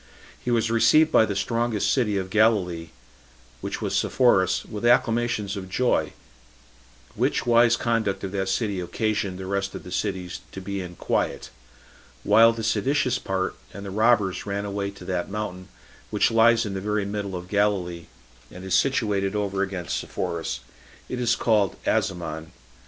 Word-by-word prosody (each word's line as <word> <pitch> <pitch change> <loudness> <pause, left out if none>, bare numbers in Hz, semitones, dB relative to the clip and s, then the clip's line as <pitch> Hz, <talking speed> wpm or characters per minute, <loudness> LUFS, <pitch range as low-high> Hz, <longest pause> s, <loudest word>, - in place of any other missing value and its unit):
He - - -3
was 115 -1 +1
received 155 +7 +5
by 110 - +5
the 100 - -3
strongest 115 0 0
city 110 -7 +1
of 95 -1 -4
Galilee, 95 -7 +2 0.7
which - - -4
was - - -1
Sepphoris, 95 -8 +2
with 105 0 -7
acclamations 115 -3 +2
of 95 -2 -6
joy; 125 +6 +1 1.0
which - - 0
wise 120 -1 +5
conduct 115 -4 -1
of 95 - -3
that 95 -1 -2
city 100 -1 -1
occasioned 100 +1 -2
the 95 - -6
rest 100 0 -2
of - - -7
the 90 - -10
cities 90 -1 -3
to - - -6
be 100 +1 -4
in 90 -1 -8
quiet; - - -2 0.7
while 115 +2 +6
the 115 -1 -5
seditious 125 +3 +1
part 95 -1 -2 0.2
and 100 0 -7
the 100 - -6
robbers 105 -2 +2
ran 100 0 -2
away 100 0 -3
to 100 - -12
that 90 -2 -2
mountain 95 -3 -5 0.4
which - - +2
lies 115 0 +4
in 100 - -4
the 95 - -4
very 105 0 -1
middle 100 -1 -4
of 90 0 -6
Galilee, 95 -4 0 0.4
and 90 - -11
is 95 - -3
situated 105 -7 +1
over 100 -2 -1
against 95 -3 -2
Sepphoris; - - -4 0.5
it 125 - -3
is 120 -1 +2
called 105 -5 +2
Asamon. 80 -3 -1
100 Hz, 165 wpm, -25 LUFS, 95-115 Hz, 1.0 s, while